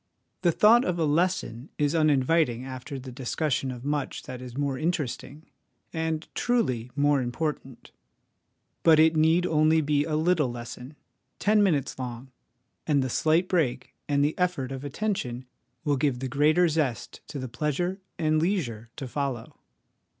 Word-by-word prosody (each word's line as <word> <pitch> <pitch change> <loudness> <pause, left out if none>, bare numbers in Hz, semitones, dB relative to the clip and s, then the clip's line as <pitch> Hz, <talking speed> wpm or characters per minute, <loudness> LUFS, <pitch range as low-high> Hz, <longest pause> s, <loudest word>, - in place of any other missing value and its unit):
The 175 - +3
thought 225 +8 +6
of 180 -6 -1
a 165 - +1
lesson 150 -5 0
is 145 0 +1
uninviting 150 -4 +2
after 130 +1 -7
the 130 0 -8
discussion 135 +2 -1
of 125 0 -7
much 145 -1 -2
that 130 -3 -8
is 125 0 -9
more 140 -2 0
interesting, 155 0 -3 0.5
and, 160 -1 -2
truly, 130 - 0
more 145 -1 +3
important; 130 0 -4 0.9
but 160 -2 +6
it 160 +1 +5
need 160 +3 +3
only 155 -1 +3
be 145 -1 +1
a 155 -1 -1
little 160 -3 +2
lesson, 120 +3 -8 0.4
ten 210 0 +3
minutes 150 -10 +1
long, 125 +1 -6 0.6
and 145 -3 +3
the 130 - -3
slight 165 +6 +2
break 160 -10 0 0.2
and 145 0 +3
the 150 - -1
effort 175 -8 0
of 135 0 -6
attention 140 - -3 0.4
will 145 -2 +1
give 140 -2 +1
the 130 +2 -4
greater 150 +6 +3
zest 150 -7 -2
to - - -7
the 130 -1 -4
pleasure 165 - -2 0.2
and 155 -1 +1
leisure 130 - -1
to 135 - -6
follow. 130 -3 -4
145 Hz, 155 wpm, -27 LUFS, 130-160 Hz, 0.9 s, thought